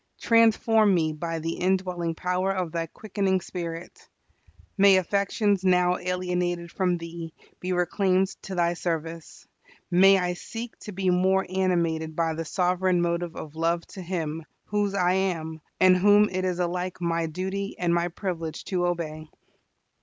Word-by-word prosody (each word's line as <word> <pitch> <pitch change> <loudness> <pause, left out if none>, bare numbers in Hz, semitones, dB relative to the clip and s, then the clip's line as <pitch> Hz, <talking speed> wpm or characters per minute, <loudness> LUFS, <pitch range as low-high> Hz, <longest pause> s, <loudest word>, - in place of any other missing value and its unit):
Transform 225 -2 +4
me 160 -2 +1
by 165 +2 -4
the 165 +1 -3
indwelling 180 -3 0
power 180 +2 0
of 185 -4 -2
Thy 165 0 -2
quickening 195 0 -1
Spirit. 170 -2 -7 0.7
May 195 -1 +6
affections 200 +1 +1
now 180 -1 +3
alienated 180 -1 -2
from 180 -2 0
Thee 165 -1 -8 0.2
be 185 - -3
reclaimed 185 +1 +1
to 190 - -6
Thy 170 -1 +2
service. 165 -1 -5 0.5
May 195 +2 +6
I 180 -1 0
seek 225 +6 -7
to 210 - -8
be 190 -1 0
more 190 +2 +2
animated 170 -4 0
by 165 -1 0
the 165 +1 -4
sovereign 180 +1 +1
motive 170 0 -2
of 155 0 -8
love 165 +1 0
to 190 - -9
Him, 165 -3 -3 0.2
whose 205 -1 -1
I 180 -2 +2
am, 165 -4 -2 0.2
and 185 0 +6
whom 205 +3 +5
it 185 0 -2
is 180 -1 -1
alike 180 +1 -2
my 170 -1 0
duty 190 +4 -4
and 175 -1 +1
my 170 0 +1
privilege 170 -3 -5
to 180 -3 0
obey. 155 -3 -4
180 Hz, 155 wpm, -26 LUFS, 170-190 Hz, 0.7 s, May